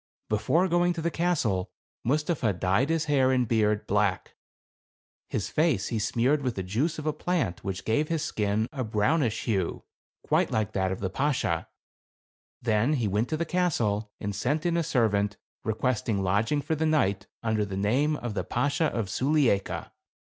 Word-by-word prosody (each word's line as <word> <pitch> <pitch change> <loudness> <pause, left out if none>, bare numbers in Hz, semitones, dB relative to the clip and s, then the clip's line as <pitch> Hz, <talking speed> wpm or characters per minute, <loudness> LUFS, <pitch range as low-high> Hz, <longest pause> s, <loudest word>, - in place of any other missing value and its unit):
Before 110 - +2
going 175 0 +2
to 170 - -4
the 170 - 0
castle, 145 - 0 0.3
Mustapha 145 - +1
dyed 95 - +1
his 165 -1 +1
hair 135 -4 +3
and 125 -2 +2
beard 105 -2 +1
black; 100 -2 0 1.0
his - - -2
face 155 - +1
he 115 - -1
smeared 125 +7 +1
with 125 -3 -2
the 95 - -3
juice 125 - -1
of 155 - -6
a 155 - +1
plant 155 - -1
which 95 -1 -4
gave 130 +8 +1
his 160 -2 -1
skin 105 -4 0
a 130 -3 -2
brown 110 +8 +1
ish 115 -4 -1
hue 95 -7 -1 0.4
quite - - +2
like 110 -2 0
that 95 -1 0
of 95 - -4
the 95 - -1
Bashaw; 130 - 0 1.0
then 115 +5 +2
he 120 -7 0
went 105 +5 0
to 155 - -1
the 170 - -1
castle 115 - 0
and 100 -1 -3
sent 150 - -1
in 170 -1 +2
a 170 - +2
servant, 105 -8 +1 0.3
request 115 +2 -1
ing 100 -3 +1
lodging 110 +10 +1
for - - -1
the 160 +1 0
night 100 -11 +1 0.2
under 110 -2 +1
the 100 -2 -4
name 130 +10 +2
of 120 -6 -4
the 95 -3 -2
Bashaw 145 - 0
of 115 -4 -2
Sulieika. 130 -2 +1
115 Hz, 180 wpm, -27 LUFS, 105-150 Hz, 1.0 s, hair